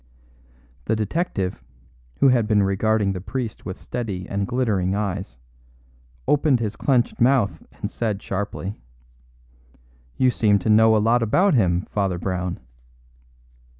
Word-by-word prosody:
The 110 - +1
detective, 105 - -2 0.6
who 140 - +7
had 120 -4 +3
been 105 -2 +3
regarding 100 +1 +1
the 90 - -5
priest 120 +2 -5
with 90 - -5
steady 100 -7 -5
and 100 0 -2
glittering 105 -7 0
eyes, 100 -8 -3 0.9
opened 145 -3 +3
his 110 -2 -3
clenched 125 -4 0
mouth 120 -5 +3
and - - -6
said 110 -4 -2
sharply: 100 - -5 1.4
"You 130 -1 +3
seem 105 -4 +3
to 100 +3 0
know 110 +1 +6
a - - +4
lot 115 +3 +3
about 180 - +3
him, 90 -6 +2
Father 95 -3 0
Brown." 90 0 -3
105 Hz, 130 wpm, -23 LUFS, 95-120 Hz, 1.4 s, who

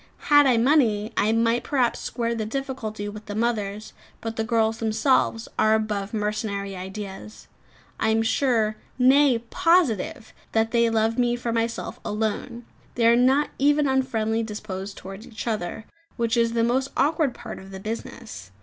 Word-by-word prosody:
Had 290 -1 +7
I 250 -3 +4
money, 230 -4 +2
I 215 - +2
might 230 +1 +2
perhaps 255 -5 +1
square 235 -1 -2
the 225 -2 -2
difficulty 220 -3 -4
with 210 +1 -9
the 205 - -5
mothers; 215 -2 -2 0.3
but 225 0 -5
the 225 - -1
girls 225 -1 +1
themselves 225 +1 +1
are 215 0 +4
above 210 -2 -2
mercenary 210 -2 -2
ideas. 195 +2 -8 0.5
I 220 - +1
am 225 0 +2
sure, 225 -3 +1 0.2
nay, 265 0 +5
positive 265 - +1 0.2
that 225 0 +2
they 235 -1 +3
love 225 +1 +1
me 240 -1 +2
for 240 -1 -3
myself 230 0 -2
alone. 220 +3 -3 0.3
They 235 - +1
are 230 +1 +6
not 260 +4 +3
even 290 +2 +3
unfriendly 230 -4 0
disposed 205 -3 -6
towards 195 +3 -9
each 215 -2 -7
other, 215 -2 -3 0.3
which 235 0 +1
is 230 -1 +2
the 230 -1 +2
most 260 +3 +1
awkward 295 -2 +2
part - - -8
of 190 - -12
the 190 0 -8
business. 220 - -7
225 Hz, 160 wpm, -24 LUFS, 215-245 Hz, 0.5 s, Had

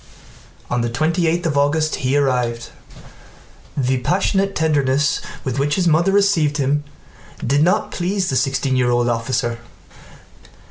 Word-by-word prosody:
On 125 0 -1
the 120 - -1
twenty 160 +8 0
eighth 170 +2 0
of 155 -3 0
August 150 +2 +1
he 130 +2 0
arrived. 125 -4 -1 1.1
The 130 -1 +1
passionate 195 +6 0
tenderness 145 -2 +1 0.2
with 130 0 -3
which 145 +1 +1
his 185 -2 +1
mother 170 +4 +3
received 195 -8 +2
him 145 +1 0 0.6
did 140 +4 +2
not 185 +7 +1
please 185 +1 -1
the - - -1
sixteen 135 +1 0
year 125 -1 +2
old 120 0 +1
officer. 120 0 -1
145 Hz, 140 wpm, -19 LUFS, 130-165 Hz, 1.1 s, mother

